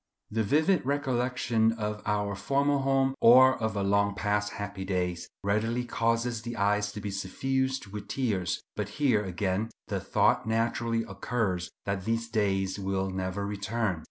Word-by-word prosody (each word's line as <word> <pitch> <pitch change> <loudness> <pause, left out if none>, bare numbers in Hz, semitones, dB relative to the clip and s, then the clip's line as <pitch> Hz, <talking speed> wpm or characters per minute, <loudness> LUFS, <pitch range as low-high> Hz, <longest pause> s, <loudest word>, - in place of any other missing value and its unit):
The 110 +1 0
vivid 155 - +2
recollection 125 -4 +1
of 105 -2 -4
our 105 -1 0
former 140 +8 +1
home, 135 0 +2
or 130 +2 +7
of 110 -1 -1
long 100 0 +2
past 105 0 0
happy 100 -1 -5
days, 90 -2 -2
readily 110 +4 0
causes 115 0 0
the 120 0 -6
eyes 105 0 +1
to 105 - -6
be 105 -1 -4
suffused 130 +7 -1
with 100 0 -8
tears; 105 -10 -1
but 105 -2 -3
here, 125 -8 +3
again, 95 +3 -1 0.2
the - - -1
thought - - +2
naturally 115 0 0
occurs 100 -4 -2 0.2
that 100 -1 -2
these 115 +1 0
days 95 -3 0
will 95 0 -1
never 95 +1 -3
return. 100 -2 -2
105 Hz, 150 wpm, -29 LUFS, 100-120 Hz, 0.2 s, or